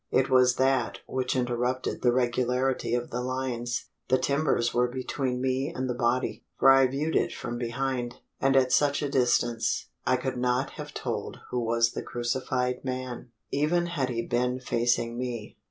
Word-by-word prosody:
It 135 0 +2
was 125 -1 +5
that 130 -2 +1
which 130 0 -1
interrupted 125 +1 -1
the 120 - +4
regularity 125 +1 +1
of 120 0 -3
the 125 - -2
lines. 125 -2 -3 0.2
The 130 - +4
timbers 140 -3 +1
were 125 0 +3
between 130 0 -2
me 130 +3 0
and 130 -5 -3
the 125 - -1
body 120 +1 0
for 135 - +7
I 135 -1 +6
viewed 145 +5 -2
it - - +2
from 120 0 -5
behind 120 0 -2 0.2
and 135 0 +3
at 130 -1 +4
such 145 0 +3
a 145 - -1
distance, 120 -3 +1
I - - +3
could 130 0 -3
not 125 +2 0
have - - -8
told - - -4
who 125 - 0
was 115 0 +2
the - - -4
crucified 125 +1 -2
man, 130 -1 -4 0.2
even 155 +5 +2
had 150 -7 -1
he 115 -1 -2
been 125 +1 0
facing 120 -1 0
me. 120 -4 -5
125 Hz, 170 wpm, -28 LUFS, 120-130 Hz, 0.2 s, for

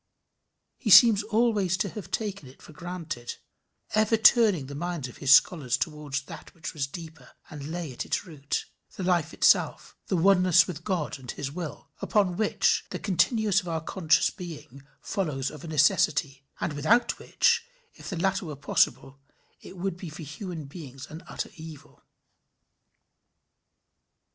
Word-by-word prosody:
He 240 - -3
seems 220 0 +8
always 210 -4 +1
to 200 - 0
have 210 +1 -8
taken 200 - -4
it 130 - -18
for - - -13
granted, 165 -7 -6 0.6
ever 215 +1 +3
turning 215 - +5
the 140 - -9
minds 170 -2 -4
of 125 - -13
his 140 - +1
scholars 135 -2 +5
towards 150 -3 -3
that - - -11
which 165 - -7
was 140 -3 -2
deeper 160 -3 -11 0.2
and 145 0 -7
lay 165 -4 -5
at - - -4
its - - -2
root 145 -5 -4 0.3
the 190 - -5
life 175 -3 +1
itself - - +2
the 185 - 0
oneness 180 0 +5
with 170 -3 -7
God 175 -8 -2
and 125 -2 -12
his 140 -1 -4
will, 165 -1 -7
upon 195 -1 +1
which 215 +2 +1
the - - -4
continuance 210 +1 +1
of 180 - -12
our 165 -1 -1
conscious 165 0 +1
being 160 - -10 0.2
follows 150 -9 -2
of 150 - -11
a - - -7
necessity, 145 -2 +1
and - - -2
without 200 +12 +2
which - - +2 0.3
if - - -10
the 190 - -4
latter 190 +1 0
were 150 - -6
possible, 140 0 0 0.4
it 190 - -12
would 185 0 -3
be 180 -2 -7
for 155 +2 -9
human 165 - -7
beings 135 -3 -10
an 160 +2 -8
utter - - -5
evil. 160 -2 -12
165 Hz, 160 wpm, -27 LUFS, 145-190 Hz, 0.6 s, seems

